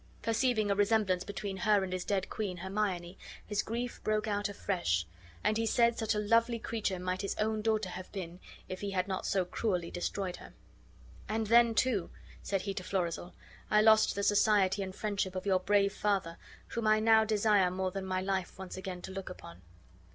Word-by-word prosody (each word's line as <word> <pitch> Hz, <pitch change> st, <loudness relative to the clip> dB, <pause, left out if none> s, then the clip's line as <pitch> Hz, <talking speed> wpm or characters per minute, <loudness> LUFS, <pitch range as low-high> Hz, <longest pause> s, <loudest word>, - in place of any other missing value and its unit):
Perceiving 225 Hz, -2 st, +1 dB
a -, -, +2 dB
resemblance 205 Hz, -3 st, +2 dB
between 200 Hz, -1 st, -5 dB
her 210 Hz, -2 st, +3 dB
and 185 Hz, -1 st, -4 dB
his 185 Hz, -1 st, -2 dB
dead 195 Hz, -2 st, -1 dB
queen 200 Hz, -5 st, -4 dB
Hermione, 190 Hz, -1 st, -3 dB, 0.3 s
his 205 Hz, -1 st, 0 dB
grief 240 Hz, +3 st, -4 dB
broke 215 Hz, 0 st, +1 dB
out 205 Hz, 0 st, -1 dB
afresh, 175 Hz, -, -1 dB, 0.4 s
and 215 Hz, -, +2 dB
he 225 Hz, 0 st, 0 dB
said 235 Hz, +1 st, +3 dB
such 225 Hz, -1 st, -1 dB
a -, -, 0 dB
lovely 230 Hz, +3 st, +2 dB
creature 220 Hz, -4 st, -2 dB
might 185 Hz, +1 st, -2 dB
his 200 Hz, -, -2 dB
own 215 Hz, 0 st, 0 dB
daughter 215 Hz, -3 st, 0 dB
have 185 Hz, +1 st, -8 dB
been 180 Hz, -3 st, -6 dB, 0.3 s
if 185 Hz, -, -6 dB
he 205 Hz, -, -2 dB
had 185 Hz, -1 st, -1 dB
not 190 Hz, -1 st, -3 dB
so 190 Hz, -2 st, +1 dB
cruelly 180 Hz, -3 st, -2 dB
destroyed 180 Hz, +1 st, -3 dB
her. -, -, -13 dB, 0.8 s
"And 220 Hz, +1 st, 0 dB
then, 230 Hz, +1 st, +5 dB
too," 215 Hz, -7 st, +1 dB, 0.3 s
said 195 Hz, -2 st, -1 dB
he 200 Hz, -, -2 dB
to 185 Hz, -, -5 dB
Florizel, 180 Hz, -2 st, -3 dB, 0.3 s
"I 210 Hz, 0 st, +5 dB
lost 220 Hz, 0 st, +5 dB
the 200 Hz, -, -2 dB
society 205 Hz, -1 st, +3 dB
and 190 Hz, -1 st, -5 dB
friendship 200 Hz, -3 st, -2 dB
of 185 Hz, -, -4 dB
your 190 Hz, -2 st, +3 dB
brave 200 Hz, +1 st, +2 dB
father, 195 Hz, -6 st, -1 dB, 0.3 s
whom 230 Hz, -2 st, -2 dB
I 215 Hz, 0 st, +5 dB
now 220 Hz, 0 st, +5 dB
desire 210 Hz, -3 st, +3 dB
more 185 Hz, +1 st, -2 dB
than 195 Hz, +1 st, -4 dB
my 185 Hz, 0 st, -1 dB
life 190 Hz, -1 st, -2 dB
once 190 Hz, -1 st, -7 dB
again 185 Hz, -1 st, -6 dB
to -, -, -6 dB
look 195 Hz, 0 st, -6 dB
upon." 85 Hz, -, -11 dB
200 Hz, 195 wpm, -32 LUFS, 185-215 Hz, 0.8 s, then